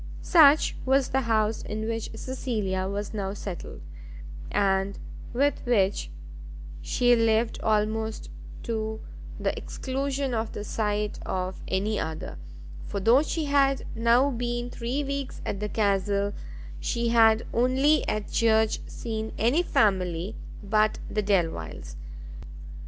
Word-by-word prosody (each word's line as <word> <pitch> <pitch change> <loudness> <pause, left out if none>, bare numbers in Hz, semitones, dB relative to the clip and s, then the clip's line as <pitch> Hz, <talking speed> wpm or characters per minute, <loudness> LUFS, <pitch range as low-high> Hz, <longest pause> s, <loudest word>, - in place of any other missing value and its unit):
Such 310 -3 +6
was 265 0 +2
the 265 - +1
house 220 -2 +1
in 215 +1 -4
which 225 -1 -3
Cecilia 215 -7 -2
was 205 +1 -4
now 200 -2 -3
settled, 195 -4 -7 0.7
and 195 -1 +1 0.3
with 280 +4 +1
which 200 - +1 0.7
she 245 - +3
lived 225 0 +1
almost 220 +1 0 0.3
to 220 -2 -3 0.4
the - - -1
exclusion 270 0 -3
of 225 -1 -2
the 205 - -5
sight 210 -1 -2
of 185 0 -3
any 205 +3 0
other; 160 - -5 0.5
for 200 - -3
though 230 +7 +5
she 315 0 -2
had 275 -1 +2
now 235 +4 +3
been 240 0 -3
three 250 +5 -2
weeks 280 -1 -4
at 200 - -3
the 210 0 -3
castle, 200 -1 +1 0.5
she 235 -1 -1
had 225 -1 +5
only 265 +6 +3
at 215 -1 -2
church 220 -1 +3
seen 220 -1 -4
any 245 +10 +3
family 190 - +1 0.3
but 215 +1 +2
the 215 - 0
Delviles. 165 - -1
220 Hz, 125 wpm, -27 LUFS, 205-245 Hz, 0.7 s, Such